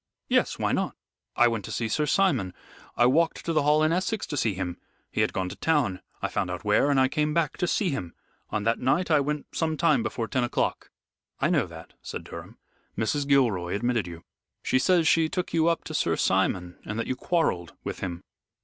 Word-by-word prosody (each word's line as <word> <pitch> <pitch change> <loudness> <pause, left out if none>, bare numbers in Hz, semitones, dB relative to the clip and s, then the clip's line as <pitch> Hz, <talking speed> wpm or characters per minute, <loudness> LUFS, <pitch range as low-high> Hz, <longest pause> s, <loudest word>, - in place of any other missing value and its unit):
"Yes, - - +2
why - - 0
not? - - -1 0.4
I 120 - +5
went 115 -3 -1
to - - -7
see 115 - -1
Sir 150 +7 0
Simon. 135 - +2 0.4
I 120 - +5
walked 160 +6 +2
to 165 - 0
the 155 - +3
Hall 150 +2 +3
in 155 - +3
Essex 190 +4 -1
to 145 - -5
see 110 -7 0
him. 90 -2 -4 0.3
He - - 0
had - - +2
gone 95 -1 -2
to - - -7
town; 140 -13 +1 0.2
I - - +2
found - - -2
out - - -5
where, 145 - +3
and 140 -2 +3
I 130 - +5
came 150 +3 0
back 165 -4 +1
to 180 - 0
see 185 -1 +1
him. 90 -11 -5 0.3
On 105 - -2
that 115 +2 +1
night 150 +8 +1
I 155 - +6
went 150 +1 -3
some 160 -1 0
time 170 +9 +3
before 120 - -3
ten 130 +1 0
o'clock." 120 - -1 0.5
"I - - +2
know - - +2
that," - - -12
said - - -6
Durham. - - -10 0.4
"Mrs. 140 +6 0
Gilroy 115 -12 +2
admitted 115 -2 0
you. 85 -1 -9 0.4
She 130 - +2
says 170 +2 +3
she 160 -1 +4
took 180 +1 -3
you 165 0 +3
up 170 0 +1
to 155 - -7
Sir 85 - +1
Simon, 90 +2 0
and 105 - -5
that 115 - -1
you 130 - -2
quarrelled 125 - 0
with - - -5
him." 90 -2 -5
135 Hz, 220 wpm, -26 LUFS, 105-160 Hz, 0.5 s, I